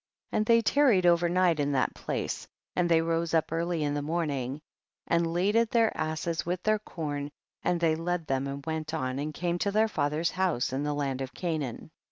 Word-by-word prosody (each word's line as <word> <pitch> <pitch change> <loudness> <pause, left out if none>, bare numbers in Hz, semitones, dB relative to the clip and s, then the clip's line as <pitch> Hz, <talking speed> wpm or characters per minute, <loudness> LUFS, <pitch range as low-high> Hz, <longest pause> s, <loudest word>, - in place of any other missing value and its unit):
And 215 0 0
they 230 0 +5
tarried 240 -9 +4
over 175 0 +4
night 175 -2 +3
in 145 0 +1
that 130 - +1
place, - - -4 0.3
and 175 -1 +2
they 165 -1 +4
rose 165 0 0
up 160 - +1
early 165 0 -1
in 145 -1 0
the 145 - -1
morning 145 -4 -2 0.5
and 170 -1 +1
laded 205 +7 +2
their 230 -1 +2
asses 160 +1 -2
with 180 +1 -3
their 215 0 +2
corn, 145 -7 -4 0.3
and 175 - +1
they 165 -2 +3
led 165 +1 -2
them 135 -1 -1
and 140 0 -6
went 160 0 -3
on 130 -3 -2
and 150 +2 -2
came 175 +3 -2
to 200 - +1
their 215 +2 +3
father's 155 -3 0
house 180 -10 0
in 135 - -1
the 145 0 -1
land 135 -2 -2
of 135 0 -5
Canaan. 155 -9 -3
165 Hz, 205 wpm, -29 LUFS, 145-180 Hz, 0.5 s, they